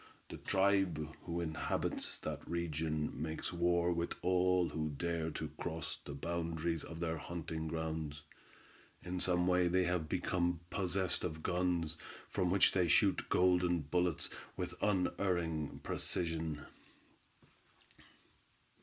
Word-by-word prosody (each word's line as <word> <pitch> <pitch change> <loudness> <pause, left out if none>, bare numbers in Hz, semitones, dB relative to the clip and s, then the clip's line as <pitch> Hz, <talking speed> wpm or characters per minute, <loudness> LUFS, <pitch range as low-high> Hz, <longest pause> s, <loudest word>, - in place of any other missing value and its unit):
The - - -6
tribe 95 -5 +2 0.2
who 85 0 -1
inhabits 80 -2 -1
that - - -5
region 80 -2 -1
makes 80 +2 -3
war 85 0 +3
with 85 0 -1
all 90 -1 +3
who 75 -1 -2
dare 80 +2 -1
to - - -4
cross 80 -1 -4
the 70 - -6
boundaries 85 +1 -1
of 80 0 -7
their 80 -2 -1
hunting 80 -1 -4
grounds. 80 -2 -3 0.8
In 90 +1 -3
some 90 -1 +2
way 90 0 +4
they 90 +1 +3
have 85 -3 0
become 85 0 0
possessed 95 -1 0
of 80 -3 -3
guns 85 -3 +1 0.3
from 90 - 0
which 95 +1 +5
they 90 -2 +3
shoot - - +4
golden 90 -2 +4
bullets 90 +3 0 0.3
with - - -2
unerring 90 -5 0
precision. 80 -3 -2
85 Hz, 120 wpm, -36 LUFS, 80-90 Hz, 0.8 s, which